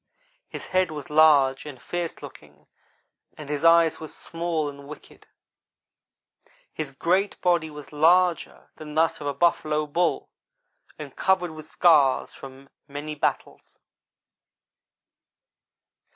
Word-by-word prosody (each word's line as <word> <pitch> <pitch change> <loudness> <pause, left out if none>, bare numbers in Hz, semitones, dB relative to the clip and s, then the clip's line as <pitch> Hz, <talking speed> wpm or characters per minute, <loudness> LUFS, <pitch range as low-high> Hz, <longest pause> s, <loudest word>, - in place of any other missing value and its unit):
His - - -8
head 185 -1 +1
was 150 -2 -8
large 145 -4 +4
and 140 -4 -10
fierce 170 +5 -5
looking, - - -14 0.7
and 150 -2 -10
his 150 +1 -3
eyes 165 -1 +4
were 160 - -7
small 165 -1 -4
and 140 -1 -10
wicked. 150 - -14 1.5
His 155 -3 -5
great 185 +8 0
body 175 -3 +1
was 150 -1 -12
larger 170 +3 +1
than 150 -1 -10
that 160 0 +1
of 145 - -5
a 145 - -1
buffalo 155 -3 +1
bull 170 +4 -1 0.7
and - - -10
covered 185 -3 +1
with 155 -1 -11
scars 145 -6 +3
of 135 0 -12 0.2
many 145 +1 -6
battles. 150 - -4
155 Hz, 120 wpm, -24 LUFS, 145-170 Hz, 1.5 s, large